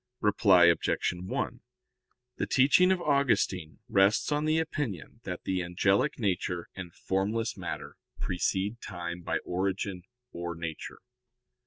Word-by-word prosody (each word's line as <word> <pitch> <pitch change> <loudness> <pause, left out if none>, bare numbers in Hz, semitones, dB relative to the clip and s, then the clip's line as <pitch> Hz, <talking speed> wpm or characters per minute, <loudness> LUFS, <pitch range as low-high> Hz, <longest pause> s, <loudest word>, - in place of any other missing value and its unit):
Reply 100 -4 +5
Obj. 85 +1 +2
1: 90 +1 -4 0.8
The - - -1
teaching 145 +8 +5
of 180 -2 +1
Augustine 105 - +1
rests 100 +8 +3
on 150 +1 +1
the 155 +1 +2
opinion 145 - -3
that - - -5
the 95 -1 -1
angelic 95 +10 +1
nature 90 -6 -1
and 90 -3 -7
formless 105 +7 -1
matter - - -6 0.2
precede 95 +5 -1
time 85 -1 -6
by - - -1
origin 95 +1 -2 0.3
or 85 0 -5
nature. 80 -2 -6
95 Hz, 125 wpm, -29 LUFS, 90-120 Hz, 0.8 s, Reply